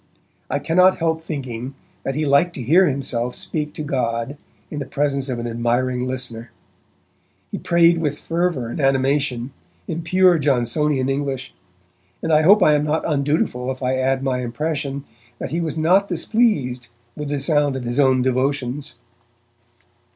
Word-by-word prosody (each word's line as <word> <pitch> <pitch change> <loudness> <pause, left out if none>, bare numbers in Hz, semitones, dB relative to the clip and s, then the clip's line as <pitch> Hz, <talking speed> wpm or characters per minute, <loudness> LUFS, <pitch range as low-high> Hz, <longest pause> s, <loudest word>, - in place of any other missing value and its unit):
I - - 0
cannot 180 +6 +4
help 160 -1 0
thinking 130 -5 -5 0.3
that 135 - -3
he 155 +1 0
liked 145 +5 +3
to 130 - -5
hear 175 +9 +5
himself 125 -4 -2
speak 150 -2 -3
to 155 - -4
God 125 -2 -2 0.4
in 150 - -4
the 140 - -5
presence 140 -1 -1
of 125 - -2
an 120 - -4
admiring 120 +2 0
listener. 125 -3 -3 1.0
He - - -4
prayed 170 0 +4
with 150 -3 -1
fervour 165 -7 -1
and 120 - -4
animation, 135 -2 +1 0.4
in 165 - -3
pure 180 0 +4
Johnsonian 135 0 +1
English, 135 -1 -3 0.7
and 165 - +1
I 155 - +6
hope 195 +5 +6
I 150 - +5
am 150 0 +2
not 155 +1 0
undutiful 140 -4 0
if 130 0 -7
I 125 +1 +1
add 135 +1 0
my 130 -2 0
impression 140 +2 -3 0.3
that - - -5
he 170 +2 -1
was 160 -2 -3
not 185 +6 +3
displeased 170 - 0 0.3
with 150 -1 -5
the 145 -1 -1
sound 145 -1 +2
of 130 - -4
his 120 +3 -2
own 130 -2 +4
devotions. 130 +2 -1
140 Hz, 160 wpm, -21 LUFS, 130-155 Hz, 1.0 s, I